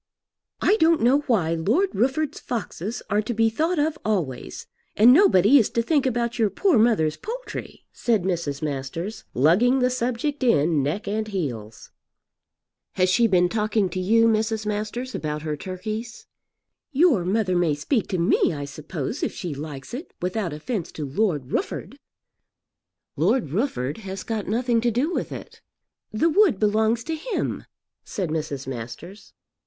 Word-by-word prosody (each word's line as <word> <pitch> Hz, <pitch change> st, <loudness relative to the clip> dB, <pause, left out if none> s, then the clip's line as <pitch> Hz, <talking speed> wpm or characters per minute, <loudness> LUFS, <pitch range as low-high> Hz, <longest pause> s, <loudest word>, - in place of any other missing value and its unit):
"I 425 Hz, -, +4 dB
don't 325 Hz, -, +3 dB
know 260 Hz, +4 st, +5 dB
why 185 Hz, -, +2 dB
Lord 225 Hz, -, +1 dB
Rufford's 275 Hz, +6 st, 0 dB
foxes 225 Hz, -2 st, -4 dB
are 205 Hz, +1 st, +3 dB
to 220 Hz, +2 st, -4 dB
be 225 Hz, 0 st, +3 dB
thought 325 Hz, +9 st, 0 dB
of 305 Hz, +1 st, 0 dB
always, 175 Hz, -, -3 dB, 0.3 s
and 235 Hz, +4 st, +7 dB
nobody 275 Hz, -, +6 dB
is 220 Hz, -, +2 dB
to 230 Hz, -, 0 dB
think 285 Hz, 0 st, +2 dB
about 240 Hz, -1 st, -1 dB
your 220 Hz, -2 st, +3 dB
poor 360 Hz, -, +2 dB
mother's 185 Hz, -10 st, +3 dB
poultry," -, -, -7 dB
said 225 Hz, -6 st, +1 dB
Mrs. 165 Hz, -6 st, -2 dB
Masters, 150 Hz, +8 st, -4 dB
lugging 185 Hz, -, +4 dB
the 250 Hz, -1 st, +2 dB
subject 255 Hz, +4 st, -2 dB
in 160 Hz, -, +3 dB
neck 150 Hz, +10 st, -2 dB
and 215 Hz, +1 st, -1 dB
heels. 120 Hz, -, -5 dB, 1.0 s
"Has 185 Hz, 0 st, +2 dB
she 230 Hz, +6 st, +4 dB
been 180 Hz, -3 st, +3 dB
talking 215 Hz, -1 st, 0 dB
to 185 Hz, -, -4 dB
you, 225 Hz, +5 st, +4 dB
Mrs. 220 Hz, 0 st, 0 dB
Masters, 215 Hz, +5 st, -3 dB
about 150 Hz, -1 st, -3 dB
her 155 Hz, -1 st, -2 dB
turkeys?" 215 Hz, +8 st, -6 dB, 0.7 s
"Your 285 Hz, -, +4 dB
mother 190 Hz, 0 st, 0 dB
may 170 Hz, -4 st, +2 dB
speak 205 Hz, -, -1 dB
to 185 Hz, -, -2 dB
me 170 Hz, 0 st, +2 dB
I 145 Hz, -1 st, -4 dB
suppose 155 Hz, -, -5 dB
if -, -, 0 dB
she 175 Hz, -5 st, -5 dB
likes 145 Hz, +1 st, -8 dB
it, 280 Hz, +9 st, -7 dB
without 180 Hz, 0 st, -2 dB
offence 165 Hz, +5 st, -4 dB
to 150 Hz, -, -4 dB
Lord 145 Hz, -3 st, -1 dB
Rufford." -, -, -3 dB, 1.2 s
"Lord 185 Hz, -, +1 dB
Rufford 165 Hz, -, -1 dB
has 195 Hz, -2 st, -6 dB
got 220 Hz, -3 st, -3 dB
nothing 235 Hz, +2 st, +1 dB
to 240 Hz, -, +2 dB
do 260 Hz, +10 st, 0 dB
with -, -, -3 dB
it." -, -, -9 dB, 0.5 s
"The 230 Hz, +10 st, +2 dB
wood 370 Hz, -, +4 dB
belongs 220 Hz, +2 st, +2 dB
to 325 Hz, -, -3 dB
him," 360 Hz, +9 st, -3 dB, 0.4 s
said 185 Hz, -6 st, -4 dB
Mrs. 150 Hz, -3 st, -3 dB
Masters. 130 Hz, -, -8 dB
215 Hz, 160 wpm, -24 LUFS, 165-245 Hz, 1.2 s, and